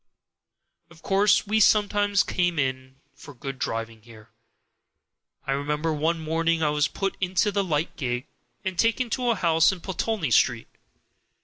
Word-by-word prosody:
Of 165 -1 -19
course 200 +2 +3
we 215 +2 +1
sometimes 205 -1 +3
came 175 -2 -1
in 130 -2 -2 0.2
for 145 +1 -13
good 135 +1 -7
driving 115 -2 -4
here. 110 0 -16 1.1
I - - -2
remember 150 +3 -1
one 160 +3 0
morning 165 +1 0
I 150 - +2
was 150 0 +1
put 195 +4 -3
into 185 +2 +1
the 200 0 0
light 160 -3 -2
gig, 125 -2 -3 0.4
and 185 -2 -3
taken 230 +1 +1
to 250 0 0
a 235 - +2
house 165 -3 +3
in 190 - -6
Pulteney 190 - -2
Street. - - +2
165 Hz, 150 wpm, -25 LUFS, 140-195 Hz, 1.1 s, course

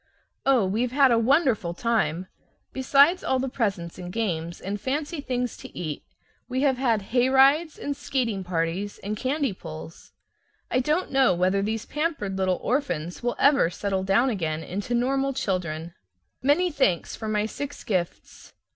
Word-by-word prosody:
Oh, 255 -7 +4
we've 225 +6 0
had 270 -1 +5
a 230 - +4
wonderful 230 - +2
time! 185 -7 0 0.5
Besides 280 +6 +4
all 265 - +1
the 260 +1 -1
presents 195 -10 -2
and 180 0 -6
games 170 -6 -2
and 200 +1 -4
fancy 295 +4 -2
things 250 -3 -2
to - - -11
eat, 155 -4 -4 0.5
we 260 +1 -1
have 270 -3 +3
had 225 -7 0
hayrides 270 +5 +4
and 285 - -3
skating 240 -8 -2
parties 180 +3 -2
and 205 +2 -2
candy 270 0 -1
pulls. 160 -2 -10 0.6
I 255 - +3
don't 300 +8 0
know 265 -8 +4
whether 185 +3 +2
these 220 +2 -2
pampered 295 - -2
little 185 -1 +1
orphans 175 - -1
will 240 0 -1
ever 280 - +4
settle 195 +1 -2
down 200 +7 +3
again 160 -6 -2
into 200 +9 -3
normal 270 +3 +1
children. 170 - -3 0.5
Many 310 +7 +3
thanks 265 - +1
for 220 - -6
my 210 -1 +1
six 285 +6 -6
gifts. 180 -5 -4
230 Hz, 155 wpm, -25 LUFS, 185-270 Hz, 0.6 s, had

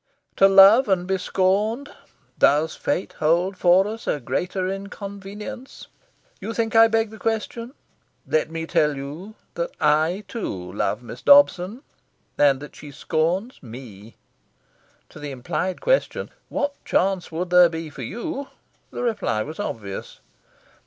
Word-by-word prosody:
To 195 - +7
love 195 +6 +7
and 180 -2 +1
be 190 0 -1
scorned 210 +11 0 0.5
does 150 +3 +3
Fate 185 - -2
hold 170 +5 +2
for 180 +1 +4
us 225 +2 -7
a 150 - 0
greater 185 +5 -2
inconvenience? 200 +5 -8 0.5
You 225 - -5
think 230 0 -1
I 225 0 +8
beg 225 -1 0
the 220 - -11
question? 230 +3 -3 0.5
Let 155 0 0
me 160 0 -4
tell 150 -2 +1
you 155 +10 -8 0.2
that - - -3
I, 160 +7 +2
too, 95 - -5
love 120 - -1
Miss 120 +1 -9
Dobson, 255 -5 +4 0.5
and 140 -2 +4
that 145 - -10
she 150 - -11
scorns 170 - -2
me." 115 -4 -11 0.9
To - - -13
the 145 0 -6
implied 140 +8 -3
question - - 0 0.2
"What 285 0 -3
chance 190 -2 0
would 175 +2 -4
there 180 -1 +7
be 160 -1 -6
for 135 - -9
you?" 265 - -5 0.4
the - - -5
reply 210 - -1
was 155 - -9
obvious. 105 - -6
185 Hz, 140 wpm, -23 LUFS, 155-220 Hz, 0.9 s, I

